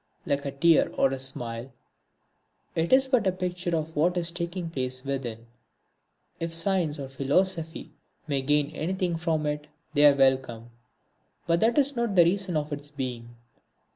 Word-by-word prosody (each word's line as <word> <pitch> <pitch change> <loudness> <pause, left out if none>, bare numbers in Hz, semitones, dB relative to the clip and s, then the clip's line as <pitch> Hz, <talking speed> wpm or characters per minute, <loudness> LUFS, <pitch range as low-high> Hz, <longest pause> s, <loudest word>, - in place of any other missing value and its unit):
Like 140 0 -1
a 140 - -2
tear 160 +4 +4
or 135 - +3
a 135 - -3
smile 120 -1 -5 1.0
it 165 +1 -1
is 265 +1 +5
but 255 -6 +2
a - - +4
picture 180 -1 -2
of 160 +1 -5
what 175 +4 +2
is 170 -1 0
taking 170 0 -4
place 130 -2 -3
within. 120 -5 -4 0.9
If 165 0 -2
Science 165 -3 +1
or 140 -2 -5
Philosophy 160 +5 -1 0.3
may 140 -4 -1
gain 145 +2 +1
anything 175 +3 -2
from 160 -2 -1
it 150 0 -3 0.3
they 145 0 +6
are 145 - +6
welcome, 130 -4 +1 0.7
but 170 0 +2
that 230 +6 +2
is 280 -1 +3
not 235 -4 -1
the 175 - +8
reason 185 -1 +1
of 150 0 -3
its 145 0 -7
being. 125 -4 -6
155 Hz, 165 wpm, -27 LUFS, 135-175 Hz, 1.0 s, the